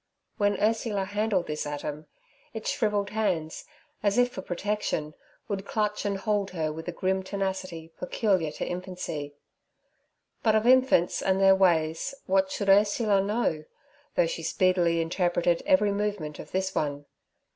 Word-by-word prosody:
When 205 Hz, 0 st, +1 dB
Ursula 215 Hz, -2 st, +1 dB
handled 205 Hz, -2 st, 0 dB
this 150 Hz, -1 st, -3 dB
atom, 150 Hz, +1 st, -5 dB, 0.5 s
its 220 Hz, -, -2 dB
shrivelled 210 Hz, -6 st, 0 dB
hands, 185 Hz, -8 st, -1 dB, 0.4 s
as 205 Hz, +1 st, +1 dB
if 245 Hz, 0 st, +4 dB
for 190 Hz, -, -6 dB
protection, 180 Hz, -5 st, -2 dB, 0.3 s
would 195 Hz, -2 st, -3 dB
clutch 210 Hz, 0 st, -1 dB
and 200 Hz, -1 st, 0 dB
hold 205 Hz, -1 st, 0 dB
her 160 Hz, -4 st, -2 dB
with 160 Hz, +2 st, -8 dB
a -, -, -1 dB
grim 190 Hz, +2 st, 0 dB
tenacity 190 Hz, -4 st, -4 dB
peculiar 185 Hz, -3 st, +1 dB
to -, -, -4 dB
infancy. 175 Hz, -5 st, -5 dB, 1.1 s
But 220 Hz, -1 st, +3 dB
of 215 Hz, +1 st, +2 dB
infants 255 Hz, -8 st, +4 dB
and 190 Hz, 0 st, +1 dB
their 195 Hz, 0 st, +7 dB
ways 170 Hz, +4 st, +2 dB
what 190 Hz, 0 st, +2 dB
should 200 Hz, -, -3 dB
Ursula 205 Hz, +1 st, +4 dB
know, 200 Hz, -7 st, -1 dB, 0.5 s
though -, -, +4 dB
she -, -, -4 dB
speedily 175 Hz, -3 st, +2 dB
interpreted 175 Hz, 0 st, +1 dB
every 280 Hz, -9 st, +4 dB
movement 200 Hz, -7 st, -3 dB
of -, -, -9 dB
this 190 Hz, 0 st, -1 dB
one? 145 Hz, -1 st, -2 dB
190 Hz, 145 wpm, -27 LUFS, 170-210 Hz, 1.1 s, their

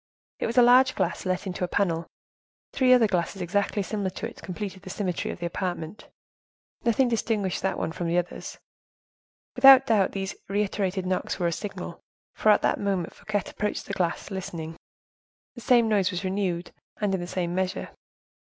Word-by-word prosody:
It -, -, -1 dB
was 235 Hz, +2 st, -4 dB
a 245 Hz, -, +8 dB
large 255 Hz, +2 st, +6 dB
glass -, -, -1 dB
let 185 Hz, +1 st, -1 dB
into 185 Hz, -1 st, -4 dB
a -, -, +1 dB
panel. 170 Hz, -3 st, 0 dB, 0.7 s
Three 255 Hz, -1 st, +3 dB
other 250 Hz, -3 st, +7 dB
glasses, 190 Hz, -1 st, -1 dB
exactly 200 Hz, +3 st, 0 dB
similar 200 Hz, -1 st, -2 dB
to 185 Hz, -, -5 dB
it, -, -, -12 dB
completed 190 Hz, +1 st, -6 dB
the -, -, -10 dB
symmetry 185 Hz, -3 st, -2 dB
of -, -, -5 dB
the 175 Hz, -, -5 dB
apartment. 175 Hz, +1 st, -4 dB, 0.8 s
Nothing 240 Hz, +3 st, +3 dB
distinguished 220 Hz, -5 st, -1 dB
that 190 Hz, -, -1 dB
one -, -, -2 dB
from 170 Hz, +1 st, -4 dB
the 170 Hz, +1 st, +1 dB
others. 175 Hz, 0 st, -3 dB, 1.0 s
Without 270 Hz, +1 st, +9 dB
doubt, 210 Hz, -6 st, +2 dB
these 195 Hz, -1 st, -3 dB, 0.2 s
reiterated 195 Hz, -2 st, -1 dB
knocks 185 Hz, 0 st, -1 dB
were 180 Hz, -, -1 dB
a 170 Hz, -, +2 dB
signal; 185 Hz, -1 st, -6 dB, 0.3 s
for, 215 Hz, -, +1 dB
at 210 Hz, -, +5 dB
the -, -, +2 dB
moment 195 Hz, -4 st, -1 dB
Fouquet 205 Hz, -2 st, -2 dB
approached 210 Hz, 0 st, -3 dB
the 200 Hz, -, -5 dB
glass 175 Hz, +1 st, -2 dB
listening, 165 Hz, -4 st, -5 dB, 0.8 s
the 240 Hz, -, -10 dB
same 240 Hz, -3 st, +4 dB
noise 205 Hz, -4 st, +2 dB
was 180 Hz, +1 st, -3 dB
renewed, 185 Hz, -2 st, -2 dB, 0.3 s
and 205 Hz, -2 st, 0 dB
in 190 Hz, -, -1 dB
the 175 Hz, -, -5 dB
same 175 Hz, -1 st, -2 dB
measure. 185 Hz, +1 st, -2 dB
195 Hz, 180 wpm, -26 LUFS, 180-210 Hz, 1.0 s, Without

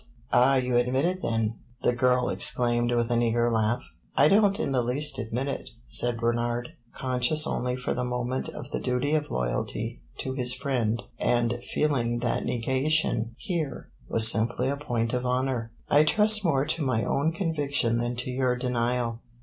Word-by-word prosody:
"Ah, 125 Hz, +3 st, +5 dB
you 125 Hz, -2 st, +1 dB
admit 125 Hz, +4 st, +1 dB
it 185 Hz, +1 st, -1 dB
then?" 115 Hz, -3 st, -1 dB, 0.2 s
the -, -, +3 dB
girl 125 Hz, +1 st, +2 dB
exclaimed, 120 Hz, -5 st, +2 dB
with 120 Hz, 0 st, 0 dB
an 120 Hz, 0 st, +2 dB
eager 120 Hz, 0 st, +1 dB
laugh. 110 Hz, +1 st, 0 dB, 0.3 s
"I -, -, +5 dB
don't 200 Hz, 0 st, +4 dB
in 185 Hz, -, -1 dB
the 130 Hz, -2 st, +2 dB
least 135 Hz, +5 st, +1 dB
admit 120 Hz, +3 st, -3 dB
it," 140 Hz, -, -4 dB, 0.2 s
said 120 Hz, -1 st, +2 dB
Bernard, 120 Hz, +1 st, -1 dB, 0.3 s
conscious 130 Hz, +4 st, +1 dB
only 125 Hz, -3 st, -1 dB
for 125 Hz, 0 st, -3 dB
the 125 Hz, -, -2 dB
moment 125 Hz, +1 st, -2 dB
of -, -, -9 dB
the -, -, -2 dB
duty 125 Hz, +4 st, -1 dB
of 150 Hz, -1 st, 0 dB
loyalty 105 Hz, -, -3 dB, 0.2 s
to 130 Hz, -, -4 dB
his 125 Hz, -1 st, -1 dB
friend 125 Hz, -4 st, -1 dB, 0.2 s
and 120 Hz, 0 st, +1 dB, 0.2 s
feeling 120 Hz, -6 st, +1 dB
that 120 Hz, -1 st, -1 dB
negation 130 Hz, -1 st, 0 dB
here 160 Hz, -8 st, -4 dB, 0.2 s
was 110 Hz, -, +5 dB
simply 120 Hz, +3 st, +1 dB
a 140 Hz, -, 0 dB
point 120 Hz, -5 st, -2 dB
of 125 Hz, 0 st, -1 dB
honor. 125 Hz, -2 st, -1 dB, 0.2 s
"I 145 Hz, +1 st, +5 dB
trust 215 Hz, +5 st, +4 dB
more 140 Hz, -6 st, +2 dB
to 160 Hz, +2 st, -1 dB
my 125 Hz, -5 st, 0 dB
own 150 Hz, +4 st, +1 dB
conviction 145 Hz, -, 0 dB
than 120 Hz, +1 st, -2 dB
to 130 Hz, -, -4 dB
your 125 Hz, -1 st, +1 dB
denial. 120 Hz, -1 st, -1 dB
125 Hz, 175 wpm, -27 LUFS, 120-140 Hz, 0.3 s, Ah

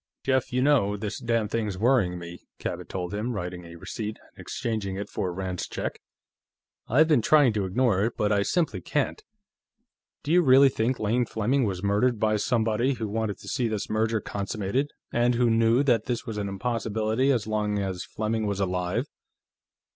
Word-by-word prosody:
"Jeff, 130 Hz, -1 st, +1 dB
you 125 Hz, +1 st, +1 dB
know, 125 Hz, -8 st, +3 dB
this 105 Hz, +1 st, -4 dB
damned 115 Hz, -4 st, 0 dB
thing's 105 Hz, -5 st, -1 dB
worrying 110 Hz, -5 st, +2 dB
me," 85 Hz, 0 st, -8 dB, 0.2 s
Cabot -, -, -5 dB
told 90 Hz, -1 st, -4 dB
him, 110 Hz, +4 st, -2 dB
writing 90 Hz, -3 st, -5 dB
a 85 Hz, 0 st, -11 dB
receipt 105 Hz, +5 st, -5 dB
and -, -, -16 dB
exchanging 105 Hz, -5 st, -3 dB
it 100 Hz, +1 st, -5 dB
for 90 Hz, -, -2 dB
Rand's 90 Hz, 0 st, -4 dB
check. -, -, -5 dB, 0.9 s
"I've 150 Hz, +7 st, +4 dB
been 150 Hz, -7 st, +4 dB
trying 145 Hz, -1 st, +5 dB
to 105 Hz, -2 st, -1 dB
ignore 105 Hz, 0 st, +2 dB
it, 115 Hz, -, -3 dB
but 105 Hz, 0 st, +1 dB
I 100 Hz, -1 st, +3 dB
simply 170 Hz, -, 0 dB
can't. 430 Hz, -, -1 dB, 1.0 s
Do 150 Hz, -, -2 dB
you 180 Hz, +1 st, +6 dB
really 135 Hz, -2 st, +7 dB
think 125 Hz, 0 st, 0 dB
Lane 115 Hz, +3 st, +1 dB
Fleming 120 Hz, +5 st, +1 dB
was 95 Hz, -2 st, -3 dB
murdered 105 Hz, +4 st, +2 dB
by 110 Hz, 0 st, +2 dB
somebody 115 Hz, +4 st, +1 dB
who 115 Hz, -3 st, -4 dB
wanted 110 Hz, -1 st, -2 dB
to -, -, -12 dB
see 120 Hz, -, 0 dB
this 110 Hz, -2 st, -3 dB
merger 110 Hz, +1 st, +1 dB
consummated 105 Hz, +7 st, -2 dB, 0.2 s
and 120 Hz, +1 st, +3 dB
who 120 Hz, -1 st, +3 dB
knew 115 Hz, +3 st, +4 dB
that 120 Hz, -6 st, +2 dB
that 125 Hz, +1 st, -2 dB
was 110 Hz, -3 st, -4 dB
an 100 Hz, -1 st, -2 dB
impossibility 110 Hz, +4 st, 0 dB
as 120 Hz, -5 st, +1 dB
long 105 Hz, -1 st, -1 dB
as 95 Hz, -2 st, -2 dB
Fleming 110 Hz, 0 st, -2 dB
was 100 Hz, -1 st, -2 dB
alive?" 90 Hz, +5 st, -1 dB
110 Hz, 185 wpm, -26 LUFS, 100-125 Hz, 1.0 s, really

